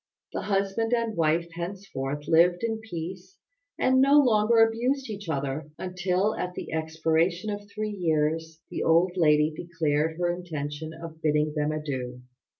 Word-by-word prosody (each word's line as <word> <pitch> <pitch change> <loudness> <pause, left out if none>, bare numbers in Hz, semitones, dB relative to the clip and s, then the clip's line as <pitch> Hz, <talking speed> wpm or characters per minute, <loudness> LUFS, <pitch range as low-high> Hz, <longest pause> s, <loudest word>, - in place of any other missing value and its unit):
The - - -2
husband 200 +3 0
and 230 -2 -1
wife 165 +1 +1
henceforth 165 -6 -5
lived 175 +3 +4
in 225 -1 -1
peace, 185 - -7 0.4
and 260 0 +4
no 280 +2 +6
longer 230 -4 +4
abused 235 +3 +2
each 205 -4 -7
other, 140 0 -2
until 185 +3 0
at 180 0 -4
the - - -6
expiration 160 +4 0
of 205 0 -6
three 215 +1 -3
years 160 -2 -1
the - - -3
old 170 +3 +4
lady 150 -3 +4
declared 160 -2 -1
her 175 0 +1
intention 155 -3 -5
of 160 0 -10
bidding 150 -1 +1
them 150 0 0
adieu. 130 -5 -4
170 Hz, 150 wpm, -27 LUFS, 155-205 Hz, 0.4 s, no